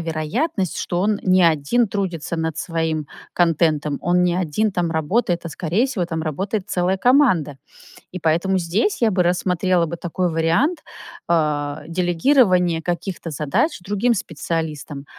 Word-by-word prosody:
вероятность, 165 - -2
что 175 - -2
он 205 0 +1
не 185 -1 +4
1 165 +9 +2
трудится 180 -5 -3
над 160 -1 -2
своим 160 -3 -2 0.3
контентом, 155 -4 +1
он 180 +1 +2
не 175 -1 +2
1 185 +4 0
там 175 -2 -1
работает, 175 +3 0
а, 170 - -5
скорее 180 - 0
всего, 200 -10 -2
там 165 -2 -3
работает 185 +6 -3
целая 180 +1 +1
команда. 190 - +3 0.5
И 185 - -6
поэтому 170 +4 +1
здесь 185 - 0
я 230 - +4
бы 185 -3 +1
рассмотрела 180 0 +1
бы 170 +1 -5
такой 175 +1 -2
вариант, 165 - +1 0.5
а, 150 -3 0
делегирования 180 - +2
каких-то 175 0 -4
задач 150 - 0
другим 205 +6 +1
специалистам, 155 -5 -4
175 Hz, 140 wpm, -21 LUFS, 160-190 Hz, 0.5 s, не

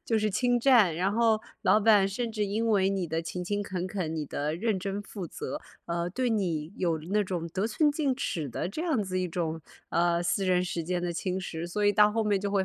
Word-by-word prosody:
就 225 -1 +1
是 215 - +1
侵 245 +5 +2
占， 235 -10 +5
然 190 +4 +1
后 225 -1 +3 0.2
老 210 - +5
板 205 -2 +5
甚 230 +3 -3
至 215 -1 0
因 210 +3 -1
为 195 -2 +3
你 190 -3 -1
的 160 +1 -2
勤 180 +2 -5
勤 205 +3 -1
恳 185 -2 -3
恳， 185 -5 -3
你 150 -2 -3
的 150 +3 -2
认 215 +2 0
真 195 +2 -3
负 200 -3 -7
责， - - -5 0.3
呃， 170 +1 -2
对 255 +6 0
你 175 -8 -1
有 170 -3 0
了 155 - -11
那 210 - +3
种 180 -4 -3
得 190 +6 -1
寸 295 +7 +2
进 285 -3 0
尺 160 - -2
的 150 +7 -3
这 310 +11 -4
样 315 -9 +1
子 185 -2 -2
一 180 - -1
种 165 -1 -2 0.3
呃， 170 0 +2
私 185 +3 0
人 180 -1 +2
时 175 -2 -3
间 175 +2 -1
的 175 0 -2
侵 185 +2 -2
蚀， 165 -2 -5
所 190 +4 -2
以 205 - +5
到 210 +1 +5
后 225 +1 0
面 205 -2 +2
就 200 0 -2
会 195 -1 +2
195 Hz, 265 characters per minute, -28 LUFS, 175-215 Hz, 0.3 s, 占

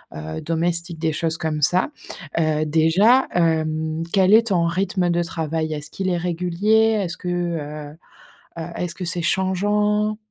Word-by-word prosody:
heu, 80 +1 -6
domestiques, 170 0 -2
des 160 -1 0
choses 160 +1 -1
comme 155 -1 -2
ça. 180 - +3 0.5
Heu, 155 -1 +1
déjà 170 - +4
hem, 160 -1 0
quel 190 -1 +4
est 230 +1 +6
ton 175 -3 +2
rythme 185 0 0
de 175 0 +1
travail? 160 -1 -3
Est-ce 150 0 -6
qu'il 190 -1 -4
est 175 - 0
régulier? 180 +6 +1
Est-ce 170 -2 -5
que, 180 - -5
heu, 155 -4 -4 0.6
heu, - - -3
est-ce 175 -2 -3
que 180 - -6
c'est 170 0 -2
changeant? 210 +4 +1
170 Hz, 155 wpm, -22 LUFS, 160-185 Hz, 0.6 s, est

